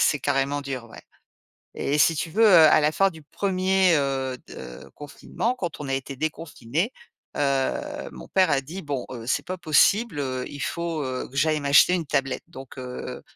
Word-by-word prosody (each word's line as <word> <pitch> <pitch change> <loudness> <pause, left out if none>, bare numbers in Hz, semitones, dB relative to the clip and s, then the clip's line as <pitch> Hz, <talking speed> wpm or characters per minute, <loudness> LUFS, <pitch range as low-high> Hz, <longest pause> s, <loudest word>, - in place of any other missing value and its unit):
c'est 150 - +2
carrément 135 +2 0
dur, 135 -3 -5
ouais - - -12 0.7
et 145 +2 -1
si 165 +3 +5
tu 160 +2 -3
veux, 220 +7 +4
à 165 -6 +7
la 150 +1 +2
fin 195 +4 +3
du 160 -3 -13
1er, 190 +1 +2
heu, 135 -2 -1
de - - -10
confinement, 220 - -4
quand 175 -8 -5
on 145 - -5
a 135 - 0
été 135 +1 -4
déconfinés, 155 - -3 0.4
heu, 145 - -1
mon - - -11
père 185 -3 +3
a 140 -2 +2
dit: 165 +8 -8
«Bon, 140 -4 -3
heu, 115 -3 -7
c'est 125 - 0
pas 185 0 -5
possible, 175 +3 +3
heu, 130 -2 -3
il 145 - -9
faut, 170 -1 -3
heu, 130 -1 -4
que 135 - -13
j'aille 155 +2 +2
m'acheter 145 +4 +5
une 170 -3 -2
tablette» 135 -2 -1
donc 135 -6 -11
heu, 125 -1 -7
150 Hz, 190 wpm, -24 LUFS, 135-175 Hz, 0.7 s, à